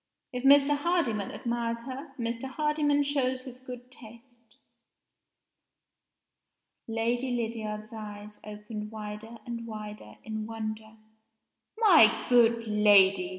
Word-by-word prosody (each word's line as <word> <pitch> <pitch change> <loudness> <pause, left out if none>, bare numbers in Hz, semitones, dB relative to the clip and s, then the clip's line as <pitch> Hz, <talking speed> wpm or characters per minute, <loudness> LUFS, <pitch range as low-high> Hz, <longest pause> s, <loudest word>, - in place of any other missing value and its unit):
If 250 0 -4
Mr. 280 +1 +6
Hardyman 285 - 0
admires 235 -1 -3
her, 270 +3 -8
Mr. 235 +1 -3
Hardyman 295 +1 +1
shows 260 -3 0
his 255 -1 -10
good 250 -1 -10
taste." 235 0 -16 2.3
Lady 235 +3 -1
Lydiard's 220 -2 -4
eyes 210 -1 -9
opened 210 0 -7
wider 215 +1 -8
and 235 -1 -6
wider 210 - -8
in 220 -1 -5
wonder. 220 -1 -6 0.8
"My 350 - +6
good 230 -1 +4
lady!" 200 -3 +5
230 Hz, 105 wpm, -28 LUFS, 215-255 Hz, 2.3 s, Mr